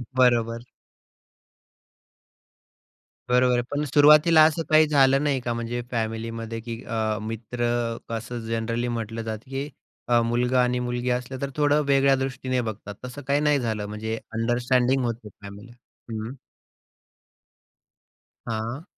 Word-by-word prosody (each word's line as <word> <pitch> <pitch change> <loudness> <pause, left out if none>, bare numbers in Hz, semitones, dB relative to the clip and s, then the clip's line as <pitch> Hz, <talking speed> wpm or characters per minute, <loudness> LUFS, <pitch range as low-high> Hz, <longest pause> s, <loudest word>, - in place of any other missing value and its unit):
बरोबर. 120 -2 +2 2.6
बरोबर, 125 0 +3
पण 145 +1 -1
सुरुवातीला 150 +3 +6
असं 160 +1 +1
काही 155 0 +6
झालं 135 -1 +4
नाही 140 -3 +1
का, 120 -1 -2
म्हणजे 120 +1 -3
फॅमिलीमध्ये 115 0 -3
की 115 0 -6
अ, 110 -1 -1
मित्र 115 +2 -3 0.4
कसं 115 +1 -4
जनरली 115 +1 -1
म्हटलं 115 -1 -3
जातं 110 +2 -6
की 135 +1 -3 0.4
अ, 120 -1 +4
मुलगा 125 +2 +1
आणि 125 0 0
मुलगी 125 0 -2
असलं 125 +1 -3
तर 140 - -2
थोडं 150 0 +3
वेगळ्या 135 0 +4
दृष्टीने 130 -1 -2
बघतात, 110 -2 -6
तसं 125 +3 -8
काही 140 +1 +2
नाही 150 -1 +3
झालं 110 -4 -2
म्हणजे 110 +1 -4 0.2
अंडरस्टँडिंग 125 +3 +1
होते 115 -2 -4
फॅमिलीत. 100 +3 -12 0.4
हं. 110 +4 -5 2.1
हां. 115 +7 -4
120 Hz, 125 wpm, -25 LUFS, 115-135 Hz, 2.6 s, सुरुवातीला